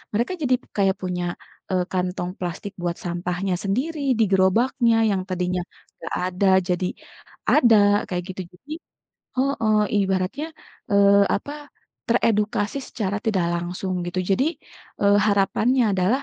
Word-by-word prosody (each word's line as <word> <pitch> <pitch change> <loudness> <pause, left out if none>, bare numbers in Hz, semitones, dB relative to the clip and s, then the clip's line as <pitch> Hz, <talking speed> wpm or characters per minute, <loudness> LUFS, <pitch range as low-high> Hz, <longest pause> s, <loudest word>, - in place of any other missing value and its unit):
mereka 235 - 0
jadi 260 -4 +2 0.2
kayak 195 -1 +3
punya, 180 -1 -2 0.4
eee, 185 -1 +2
kantong 180 -1 -2
plastik 180 +3 -5
buat 175 -1 -1
sampahnya 180 +2 -2
sendiri 270 - -1
di - - +5
gerobaknya 225 +4 +3
yang 195 -3 0
tadinya 180 0 -1 0.4
enggak - - -6
ada 185 +2 +1 0.2
jadi 180 0 0 0.6
ada 235 -7 +6 0.3
kayak 180 -1 -2
gitu. 190 - -4
Jadi 275 +12 -10 0.6
heeh, 230 -5 +2 0.3
ibaratnya, 190 +10 -1 0.4
eee, 200 0 +5
apa, 290 +6 -4 0.4
teredukasi 215 0 +1
secara 205 -5 -3
tidak 190 -6 +1
langsung 180 +2 -3
gitu. 175 +1 -2
Jadi, 225 +9 +3 0.6
eee, 200 0 +5
harapannya 215 +3 +2
adalah, 195 +9 +1
200 Hz, 125 wpm, -23 LUFS, 180-230 Hz, 0.6 s, ada